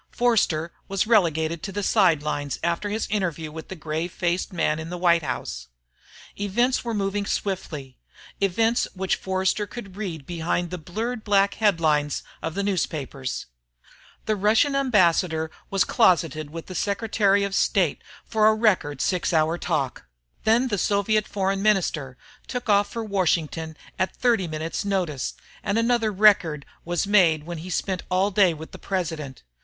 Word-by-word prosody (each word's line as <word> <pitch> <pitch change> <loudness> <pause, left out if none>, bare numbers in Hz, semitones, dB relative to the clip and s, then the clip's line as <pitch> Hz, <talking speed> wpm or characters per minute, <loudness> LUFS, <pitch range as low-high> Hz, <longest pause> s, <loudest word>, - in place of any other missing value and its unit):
Forster 190 -9 +1
was 195 0 0
relegated 165 -7 +2
to 195 - -5
the 205 +1 -3
sidelines 150 - +2
after 170 +5 0
his 215 +2 -1
interview 170 -7 -2
with 160 0 -8
the 190 - -7
grave 160 +2 -3
faced 175 +3 -1
man 160 -3 0
in 160 +1 -6
the 180 - -4
White 170 -1 +4
House. - - -5 0.7
Events 240 +6 +1
were 230 -2 -2
moving 200 0 -1
swiftly 150 -9 -4 0.4
events 225 +5 +2
which 190 0 0
Forster 190 +2 -1
could 200 -4 -9
read 175 -9 -5
behind 175 +1 -2
the 180 - -4
blurred 220 +8 -4
black 200 -1 +3
headlines 160 -8 +1 0.2
of 160 - -4
the 200 - -1
newspapers. 145 -9 -2 0.8
The 215 - +1
Russian 220 +8 +3
ambassador 175 -10 +2 0.2
was 195 0 +3
closeted 165 - +2
with 165 +2 -7
the 185 - -8
Secretary 200 0 +1
of 200 -1 -2
State 185 -5 +2 0.2
for 215 -1 +3
a 220 - +5
record 185 - +1
six 180 -2 0
hour 160 +1 +2
talk. 140 - -2 0.4
Then 235 +4 +3
the 205 -3 -1
Soviet 205 +2 +1
Foreign 195 -1 -1
Minister 165 -11 +1 0.3
took 245 -2 -4
off 205 0 +4
for 230 +2 -4
Washington 165 -5 -1 0.2
at 185 - 0
30 230 -7 +2
minutes' 160 +4 -3
notice, 180 -9 -2 0.3
and 200 +1 -1
another 230 -1 +2
record 190 -8 +4 0.2
was 175 +2 -1
made 175 -7 +4
when 170 0 -6
he 175 +3 -8
spent 185 +1 -1
all 190 +2 +2
day 190 -2 +4
with 160 0 -8
the - - -10
President. 160 -8 -4
185 Hz, 155 wpm, -24 LUFS, 160-205 Hz, 0.8 s, a